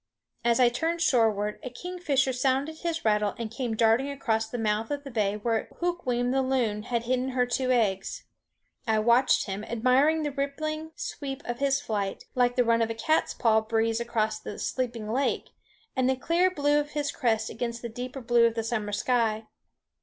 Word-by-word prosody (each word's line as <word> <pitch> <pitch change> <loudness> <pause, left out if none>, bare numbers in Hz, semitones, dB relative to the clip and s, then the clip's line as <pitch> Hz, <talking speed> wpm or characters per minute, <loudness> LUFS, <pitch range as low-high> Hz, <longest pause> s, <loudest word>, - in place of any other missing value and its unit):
As 235 0 +3
I 245 -1 +6
turned 325 +8 -1
shoreward 220 -8 +2
a 255 - -5
kingfisher 280 -2 -1
sounded 270 +5 0
his 330 -4 -3
rattle 210 -2 +2
and 230 -2 -4
came 235 -1 -3
darting 230 +5 +3
across 225 -6 -1
the 245 - -4
mouth 220 0 0
of 285 -1 -3
the 275 - -8
bay 210 -3 0
where 225 +1 -1
Hukweem 255 -9 0
the 270 +1 +2
loon 250 -5 0
had 235 +1 -2
hidden 255 +2 0
her 250 -1 +1
two 255 +1 -1
eggs. 210 -6 0 0.6
I 220 -1 +3
watched 235 +4 +4
him, 200 +1 -4
admiring 260 +8 +2
the 295 - -1
rippling 310 +3 -3
sweep 275 -1 -5
of 240 0 -4
his 275 0 +2
flight, 205 -8 -3
like 245 -1 +2
the 250 - +4
run 230 0 +3
of 225 - +1
a 230 - -3
cat's 310 +8 +1
paw 220 -2 +3
breeze 225 +1 0
across 220 -2 -1
a - - -6
sleeping 240 -4 -3
lake, 270 +2 -1 0.4
and 260 0 +2
the 265 - +2
clear 340 +7 +2
blue 290 -4 +2
of 295 0 -4
his 290 -1 -1
crest 225 -5 0
against 235 0 -4
the - - -2
deeper 250 +3 -6
blue 235 -1 +4
of 225 -1 -2
summer 220 -3 -2
sky. 225 -1 +1
245 Hz, 190 wpm, -27 LUFS, 225-275 Hz, 0.6 s, I